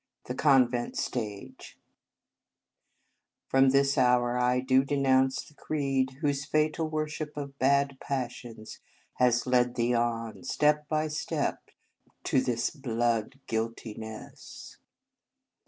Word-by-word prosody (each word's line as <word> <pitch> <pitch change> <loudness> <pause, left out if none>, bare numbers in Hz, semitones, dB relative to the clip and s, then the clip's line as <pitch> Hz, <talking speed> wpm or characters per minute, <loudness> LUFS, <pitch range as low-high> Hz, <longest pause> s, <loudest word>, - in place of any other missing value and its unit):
The 125 - -4
Convent 130 -3 +2
Stage 105 -5 -5 1.7
FROM 135 0 +4
this 140 +1 +3
hour 125 -1 +3
I 125 0 +2
do 130 +1 +3
renounce 135 -1 +2
the - - -18
creed 135 -3 -1
whose 140 -2 0
fatal 155 +2 0
worship 155 -1 -4
of 140 -1 -6
bad 140 0 +2
passions 120 -4 -5 0.4
has 125 -1 +3
led 125 -1 +2
thee 120 +1 +1
on, 115 -1 -2
step 150 +2 +1
by 155 0 0
step, 150 0 -3 0.5
to 130 - +2
this 120 -2 -1
blood 120 -3 -1
guilti 115 -1 -3
ness!" 110 0 -10
130 Hz, 110 wpm, -28 LUFS, 120-140 Hz, 1.7 s, FROM